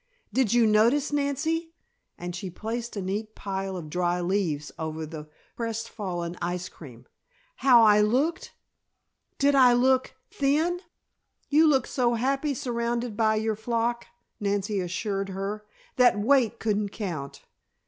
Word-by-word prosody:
Did 255 -5 +2
you 240 -1 +4
notice, 230 +8 +3
Nancy," 320 +4 -1 0.4
and 175 0 -6
she 185 +1 -5
placed 225 +6 -5
a 200 - -3
neat 210 +4 -4
pile 195 -1 -4
of 165 -3 -7
dry 175 +2 0
leaves 175 -5 -1
over 160 0 -4
the 155 -1 -9 0.3
crest 230 -1 -3
fallen 175 -5 -4
ice 175 +1 -3
cream, 125 -6 -13 0.5
"how 245 -4 +6
I 210 -1 +6
looked? 260 +10 0 0.9
Did 285 0 +3
I 255 -3 +6
look 260 +2 +2 0.2
thin?" 310 +6 +1 0.7
"You 310 +2 +5
looked 270 -4 +2
so 240 -2 +1
happy 275 +4 0
surrounded 235 -3 -2
by 220 -1 +2
your 220 0 0
flock," 235 +2 -1 0.3
Nancy 200 0 -1
assured 195 +2 -2
her, 200 +2 -5 0.3
"that 250 -4 +5
weight 235 0 +3
couldn't 210 -2 0
count. 170 -10 -6
220 Hz, 140 wpm, -26 LUFS, 190-250 Hz, 0.9 s, how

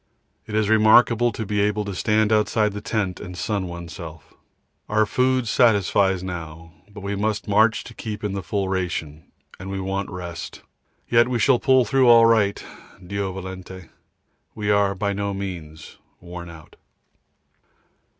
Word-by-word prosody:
It 105 - -5
is 110 -1 +2
remarkable 115 +2 +5
to 110 - -5
be 105 0 0
able 105 0 0
to 100 - -4
stand 105 +3 +1
outside 105 0 +1
the 105 - -6
tent 100 -3 -2
and 90 -1 -8
sun 100 -2 -2
oneself. 85 -2 -9 0.6
Our 110 0 +3
food 130 +1 +1
satisfies 100 -5 +2
now, 80 -2 -7 0.2
but 100 0 -11
we 100 +1 -3
must 105 +2 -2
march 110 +2 +3
to - - -11
keep 105 -1 -6
in 105 - -1
the 100 - -3
full 100 +1 -2
ration, 90 -5 -3 0.3
and 95 +1 -7
we 95 0 -3
want 95 +1 -3
rest, 85 -2 -7 0.4
yet 120 0 +4
we 125 -1 -1
shall 120 +2 +3
pull 130 -4 +4
through 130 +3 +3
all 115 -1 +8
right, 110 -3 +2 0.4
D.V. 95 -1 -6 0.7
We 105 -1 -1
are 100 -1 +2
by 100 +1 -1
no 100 0 -3
means 85 -6 -8 0.2
worn 85 0 -9
out. 80 -2 -14
100 Hz, 155 wpm, -23 LUFS, 95-110 Hz, 0.7 s, all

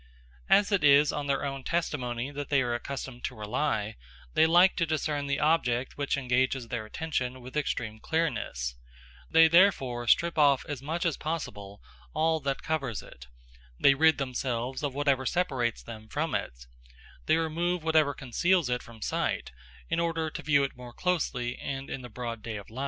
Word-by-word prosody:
As 205 +1 +5
it 200 -5 +2
is 145 0 +6
on 145 -1 -3
their 140 0 0
own 135 -1 -4
testimony 130 -7 -2
that 145 -1 -6
they 140 -2 +3
are 120 -1 -1
accustomed 130 0 -5
to - - -4
rely, 110 0 -2 0.4
they 160 - +5
like 175 +3 +6
to 170 - +2
discern 150 -2 -1
the 140 +1 0
object 130 -6 +1
which 140 -1 -1
engages 130 -1 0
their 110 -3 -4
attention 130 -2 -3
with 130 +2 -11
extreme 115 -7 -2
clearness; 110 - -1 0.6
they 165 0 +7
therefore 135 -10 +3
strip 170 +5 +3
off 140 -3 +4
as 145 -5 -5
much 160 +5 -2
as 165 -4 +1
possible 105 -11 -5 0.3
all 160 +1 +2
that 140 -2 -3
covers 140 -9 -2
it, 60 -1 -13 0.5
they 140 - +6
rid 160 +3 +4
themselves 130 -1 -2
of 140 -3 -2
whatever 140 -2 +2
separates 130 -10 0
them 110 -2 -10
from 155 +8 -2
it, - - -4 0.6
they - - +4
remove 165 +2 -1
whatever 155 -3 +3
conceals 155 +4 +1
it 125 - 0
from 115 -3 -11
sight, - - -1 0.4
in 165 - 0
order 165 -2 -1
to - - -6
view 145 -2 +3
it 140 - -3
more 125 -1 -10
closely 130 -9 -1
and 135 0 -5
in 135 - -4
the 125 - -9
broad 115 -1 -6
light 110 -2 -5
of 100 - -9
day. 115 +4 -10
140 Hz, 180 wpm, -28 LUFS, 120-160 Hz, 0.6 s, they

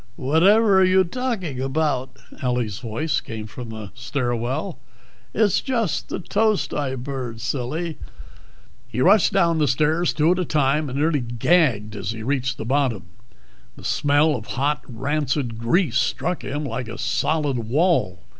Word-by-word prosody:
"Whadtever 190 - +4
are - - +6
you 185 0 +5
talking 185 - -3
about?" 135 -2 -1 0.2
Ellie's 125 -6 -1
voice 130 +7 -2
came 110 -1 -7
from 115 +2 -8
the 110 -3 -8
stair 120 +1 -2
well. 135 - -3 0.5
"It's 210 -4 +2
just 230 - -1
the - - -3
toast 215 +3 0
I 140 -3 -2
burned, 125 -3 -5
silly." 140 +7 -3 0.9
He 125 - -5
rushed 200 +9 +5
down 170 -5 +2
the 150 - +3
stairs 155 +6 +2
two 155 +2 +2
at 180 - +1
a - - +1
time 150 0 +1
and 130 - -4
nearly 150 0 +2
gagged 120 -3 +1
as 100 +1 -3
he 110 -1 -7
reached 135 +1 -1
the - - -5
bottom. 125 -7 0 0.7
The - - -14
smell 145 +1 +2
of 110 -3 -7
hot, 145 +3 +1
rancid 135 -1 -2
grease 130 +5 +2
struck 180 0 -1
him 145 +2 -3
like 125 -2 -4
a 115 - -7
solid 150 -5 0
wall. 115 - +1
140 Hz, 155 wpm, -23 LUFS, 120-165 Hz, 0.9 s, are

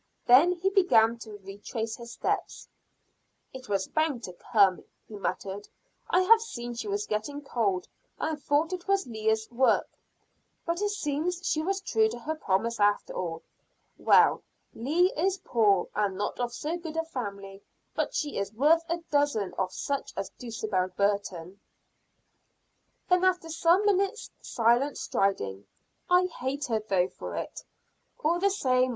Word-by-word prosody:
Then 280 +9 +7
he 370 +2 -1
began 235 - +4
to 215 -3 -9
retrace 220 +3 -5
his 235 -1 -9
steps. - - -3 0.9
"It 255 -2 -10
was 195 -2 0
bound 310 -6 0
to 180 - -6
come," 195 -1 +2 0.2
he - - -13
muttered. 195 +1 -4 0.4
"I 365 - +4
have 450 +4 +6
seen 240 - -6
she 240 - -5
was 410 +1 -1
getting 285 - -3
cold 200 -9 -1 0.3
and 310 -2 -3
thought 300 +5 +1
it 360 0 -6
was 395 0 +2
Leah's 220 -2 -1
work, 255 +2 +3 0.8
but 340 +3 -1
it 415 - +1
seems 350 -2 -2
she 310 - +1
was 390 +4 -1
true 220 - +2
to 235 - -6
her 295 +7 -3
promise 230 -5 -1
after 205 0 +2
all. 165 -2 -4 0.5
Well, - - +5 0.3
Leah 330 - +2
is 375 +5 +1
poor, 210 - +2
and 200 -3 0
not 205 +4 -3
of 245 -1 -1
so 300 +8 -3
good 325 -2 -7
a 325 - 0
family, 200 -9 -6 0.3
but - - -2
she 295 -7 -1
is 200 0 -3
worth 300 +8 +4
a 340 0 -2
dozen 285 -11 +1
of 185 -1 0
such 280 -1 -3
as 195 - -3
Dulcibel 215 -6 -2
Burton." 200 -2 -1 1.5
Then 360 0 +3
after 365 -3 +2
some 340 +5 +3
minutes' 400 +2 +1
silent 240 +4 +2
striding, 100 - -1 0.4
"I 360 +1 +5
hate 280 -4 -3
her 220 - +3
though 190 -4 +1
for - - -7
it, - - -5 0.6
all 335 +3 +2
the 400 +2 +3
same. 255 -9 +2
250 Hz, 155 wpm, -28 LUFS, 205-335 Hz, 1.5 s, Then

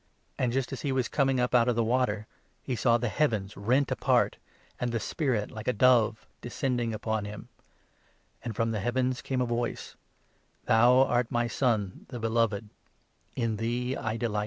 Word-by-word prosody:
And 125 -2 +1
just 135 +1 -1
as 135 - -5
he 140 - -1
was 130 -2 0
coming 135 -2 +1
up 125 0 0
out 120 -1 +5
of 125 - +3
10 - - -8
the 115 - +2
water, 110 -3 0 0.4
he 130 - -2
saw 120 0 +3
the 120 +1 -2
heavens 110 -6 0
rent 125 +7 +1
apart, - - +2 0.4
and 125 -1 -1
the 115 - -1
Spirit, 120 - -1
like 110 0 -8
a 125 - +2
dove, 115 -1 +3 0.2
descending 120 -1 -2
upon 110 -1 -2
him, 105 0 -8 0.9
and 115 -3 -5
from 115 +1 0
the 110 - -2
heavens 125 +3 0
came 130 -2 -2
n - - +3
a - - -2
voice 120 0 -3 0.4
— - - -40
"Thou 125 +3 +5
art 120 -2 +1
my 120 0 0
Son, 110 -5 -1
the 125 -2 -6
Beloved; 115 -2 0 0.7
in 115 -3 -1
thee 120 +3 -1
I 110 0 -3
delight." 110 -2 -1
120 Hz, 190 wpm, -28 LUFS, 110-125 Hz, 0.9 s, out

